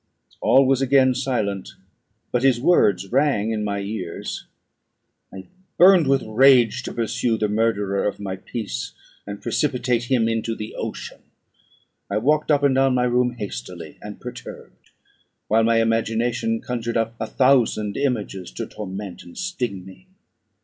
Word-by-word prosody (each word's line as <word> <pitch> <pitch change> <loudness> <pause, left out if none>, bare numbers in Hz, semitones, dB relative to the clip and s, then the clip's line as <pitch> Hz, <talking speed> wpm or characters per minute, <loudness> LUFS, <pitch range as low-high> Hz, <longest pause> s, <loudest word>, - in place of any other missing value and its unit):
All 135 +1 +5
was 135 0 +2
again 135 -1 +4
silent; 120 -7 -2 0.6
but 125 - +1
his 130 -3 +3
words 105 - +2
rung 130 -5 +2
in 110 -1 -2
my 100 -1 -2
ears. 100 -4 -5 0.8
I 95 0 -9 0.3
burned 180 -3 +6
with 135 -1 +2
rage 125 +1 +4
to - - -6
pursue 115 0 -1
the 105 - 0
murderer 105 -2 0
of 100 - -4
my 95 -2 -4
peace, 100 - -5 0.3
and 100 0 -6
precipitate 125 -4 0
him 120 -3 +2
into 115 0 -1
the 105 0 -7
ocean. - - -6 0.9
I 100 - -1
walked 150 +8 +1
up 145 -2 +3
and 140 -2 +4
down 135 -1 +3
my 125 - +2
room 125 0 +1
hastily 85 - -7
and 105 -1 -9
perturbed, 125 0 -10 0.6
while 110 +1 +3
my 115 0 +3
imagination 115 0 0
conjured 120 -1 -3
up 115 0 -1
a 110 - -3
thousand 120 -6 +2
images 110 - -2
to - - -4
torment 100 -2 -7
and 85 - -14
sting 125 - -4
me. 95 - -15
115 Hz, 150 wpm, -22 LUFS, 105-130 Hz, 0.9 s, burned